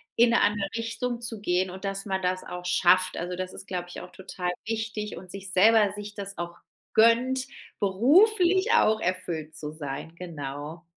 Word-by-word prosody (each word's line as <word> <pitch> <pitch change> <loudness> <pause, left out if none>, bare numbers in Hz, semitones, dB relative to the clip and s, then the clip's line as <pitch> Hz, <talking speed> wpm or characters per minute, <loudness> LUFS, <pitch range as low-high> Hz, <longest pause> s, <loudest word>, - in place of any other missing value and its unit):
in 235 0 +5
'ne - - +4
andere 205 -1 +2
Richtung 235 +1 -3
zu 225 -2 -5
gehen 185 -1 +1
und 190 +2 -8
dass 195 +1 -3
man 190 -1 -2
das 185 0 -1
auch 180 0 -7
schafft. 185 +1 +4
Also, 175 +1 -3
das 185 0 -5
ist 190 - -10
glaube 180 -1 -4
ich - - -8
auch 180 - -11
total 185 -1 -4
wichtig 220 -1 -3
und 180 +1 -11
sich 195 -1 -8
selber 210 +1 +5
sich 205 0 -7
das 200 -1 -7
auch 170 0 -5 0.4
gönnt, 255 +4 +4 0.3
beruflich 365 - +4
auch 220 - +4
erfüllt 170 -4 -3
zu 150 0 -6
sein. 155 +2 -6
Genau. 155 -1 -7
195 Hz, 180 wpm, -27 LUFS, 180-225 Hz, 0.4 s, in